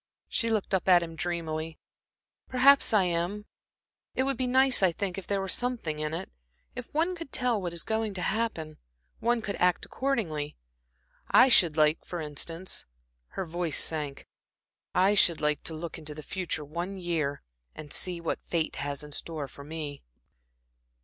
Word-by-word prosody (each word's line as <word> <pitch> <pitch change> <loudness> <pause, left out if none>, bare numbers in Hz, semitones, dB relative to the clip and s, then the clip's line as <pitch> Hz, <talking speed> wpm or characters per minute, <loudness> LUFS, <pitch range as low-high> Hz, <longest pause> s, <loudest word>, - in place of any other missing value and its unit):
She 230 - 0
looked 215 -3 0
up 190 - +1
at 180 -2 +7
him 165 -1 -7
dreamily. 160 -2 -3 0.7
"Perhaps 270 +2 +6
I 210 -3 +5
am. 180 +4 -1 0.7
It 260 - +2
would 270 0 +1
be 255 +1 -1
nice, 260 0 +5
I 190 -2 +5
think, 185 +1 -3
if 195 - -7
there 200 -1 +1
were 195 - -3
something 220 -8 -1
in 155 0 -2
it, 165 - -5 0.4
if 250 -1 -7
one 330 +4 +1
could 330 -5 -8
tell 245 -4 +1
what 175 -2 -3
is 170 0 -3
going 220 -2 -1
to 180 - -3
happen. 170 -9 -2 0.4
One 235 -1 +1
could 200 - -3
act 180 0 +2
accordingly. 175 - -2 0.7
I 265 - +7
should 170 -9 +5
like, 155 0 +3
for 175 - -5
instance" 165 +4 -2 0.5
her 190 - -1
voice 170 -2 -1
sank 150 -3 -1 0.7
"I 190 +3 +5
should 175 -5 +4
like 150 -1 +1
to 160 - -3
look 165 +1 -6
into 150 -1 -6
the 155 - -8
future 170 -3 -3
one 175 +6 -4
year, 165 -6 -2 0.3
and 150 -1 -7
see 180 -2 +1
what 170 - -3
fate 165 -2 -1
has 145 0 -3
in 150 - -10
store 150 -1 -3
for 140 - -12
me." 150 -1 -6
175 Hz, 175 wpm, -29 LUFS, 155-215 Hz, 0.7 s, at